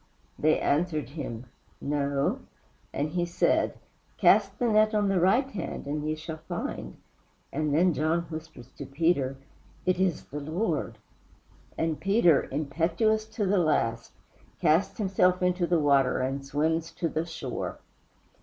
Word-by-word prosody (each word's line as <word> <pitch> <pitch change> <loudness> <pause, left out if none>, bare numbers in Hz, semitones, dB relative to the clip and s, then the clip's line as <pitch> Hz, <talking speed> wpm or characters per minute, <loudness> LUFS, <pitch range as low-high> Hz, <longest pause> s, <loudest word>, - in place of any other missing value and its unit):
They 155 +1 +3
answered 150 -3 0
him 130 -5 -6 0.3
"No;" 140 -1 0 0.5
and 145 +2 -2
he 175 +2 -1
said, 175 0 +1 0.4
"Cast - - +4
the 245 - +1
net 215 0 +3
on 205 -1 +2
the 195 -2 +2
right 220 +10 +3
hand 210 - -5
and 150 +1 -3
ye 155 +1 -1
shall 160 0 -7
find." - - -5 0.6
And 150 +1 0
then 170 +4 +3
John 155 +3 +1
whispers 155 -6 -9
to 140 - -7
Peter, 140 -3 +1 0.5
"It 185 -1 +1
is 185 -4 +1
the 145 - -6
Lord!" 160 +10 -2 0.8
and 160 -2 -1
Peter, 195 -6 +3
impetuous 165 +10 0
to 220 -1 -3
the 195 0 +2
last, 115 -8 0 0.5
casts 170 +2 +2
himself 185 -3 +2
into 180 -1 +1
the 175 -1 +2
water 140 -3 +3
and 135 +2 -2
swims 155 +4 0
to 170 - -1
the 160 0 -1
shore. 160 -6 -5
160 Hz, 145 wpm, -28 LUFS, 145-180 Hz, 0.8 s, Cast